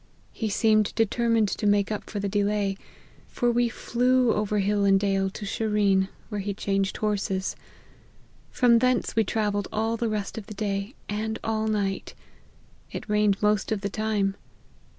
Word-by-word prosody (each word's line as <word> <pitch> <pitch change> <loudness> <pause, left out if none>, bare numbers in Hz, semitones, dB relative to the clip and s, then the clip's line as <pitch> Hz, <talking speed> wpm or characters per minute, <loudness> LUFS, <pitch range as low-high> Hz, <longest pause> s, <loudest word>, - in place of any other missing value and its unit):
He 220 - -2
seemed 215 0 +2
determined 225 0 +2
to 210 - -1
make 205 0 +2
up 210 - -3
for 205 - -4
the 200 - -1
delay, 205 0 0 0.5
for 240 -1 0
we 240 0 +2
flew 250 +1 +2
over 210 0 0
hill 205 0 +1
and 195 -1 +5
dale 195 -1 +1
to 205 +2 -7
Sherean, 200 -2 +1 0.2
where 210 -3 -3
he 200 0 -3
changed 195 -1 -1
horses. 200 -3 -1 0.9
From 235 -2 +4
thence 255 -1 +1
we 225 - +4
travelled 205 -2 -1
all 225 +1 0
the 230 0 -1
rest 210 0 -3
of 205 - -12
the 210 - -8
day 200 +2 -3
and 220 +1 -2
all 220 -1 -1
night; 200 -3 -2 0.8
it - - -6
rained 210 -1 +2
most 210 +1 +2
of 215 -2 0
the 200 - -2
time. 210 -2 0
210 Hz, 165 wpm, -26 LUFS, 200-220 Hz, 0.9 s, and